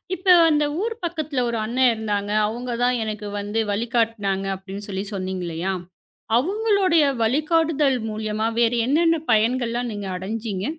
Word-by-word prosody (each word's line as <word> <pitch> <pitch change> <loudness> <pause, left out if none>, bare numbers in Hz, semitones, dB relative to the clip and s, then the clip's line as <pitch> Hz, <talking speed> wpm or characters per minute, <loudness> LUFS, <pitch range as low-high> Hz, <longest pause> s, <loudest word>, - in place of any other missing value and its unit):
இப்போ 370 +1 +4 0.2
அந்த 300 -1 +2 0.2
ஊர் 455 +2 -2
பக்கத்துல 310 -6 -2
ஒரு 235 - -2
அண்ணன் 250 +4 +1
இருந்தாங்க. 205 -2 -2 0.2
அவங்க 240 +2 -4
தான் 250 0 +2
எனக்கு 210 -1 -5
வந்து 205 +2 -2
வழிகாட்டுனாங்க 220 -3 0
அப்டின்னு 195 +2 -8
சொல்லி 190 0 -3
சொன்னீங்க 185 -1 -3
இல்லையா? 170 +3 -2 0.6
அவங்களுடைய 385 - +2 0.2
வழிகாட்டுதல் 300 0 +2
மூலியமா 215 0 -2
வேறு 235 0 +3
என்னென்ன 330 +3 +3
பயன்கள்லாம் 240 +2 +1
நீங்க 205 -1 -5
அடைஞ்சீங்க? 200 +1 -4
230 Hz, 135 wpm, -23 LUFS, 205-295 Hz, 0.6 s, இப்போ